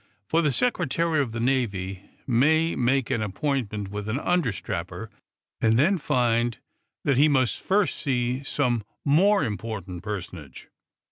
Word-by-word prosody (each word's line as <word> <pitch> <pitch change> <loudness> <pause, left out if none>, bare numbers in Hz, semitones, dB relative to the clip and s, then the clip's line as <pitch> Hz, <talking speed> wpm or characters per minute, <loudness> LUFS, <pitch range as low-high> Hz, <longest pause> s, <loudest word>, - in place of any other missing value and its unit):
For 165 +8 +2
the 150 -3 +2
Secretary 165 - +1
of 130 -5 -2
the 115 - -4
Navy 100 -7 -1 0.2
may 155 +7 +3
make 130 +1 +1
an 115 - 0
appointment 105 -1 -2
with 105 +1 -5
an 110 - 0
understrapper, 100 - -2 0.5
and 115 0 +3
then 175 +8 +3
find 120 -4 +1 0.5
that 140 -3 +2
he 150 +3 +5
must 130 -4 +1
first 195 0 +1
see 125 -2 -1
some 125 -5 0 0.2
more 195 +8 +4
important 100 -5 -5
personage. 90 -9 -7
120 Hz, 135 wpm, -25 LUFS, 105-145 Hz, 0.5 s, he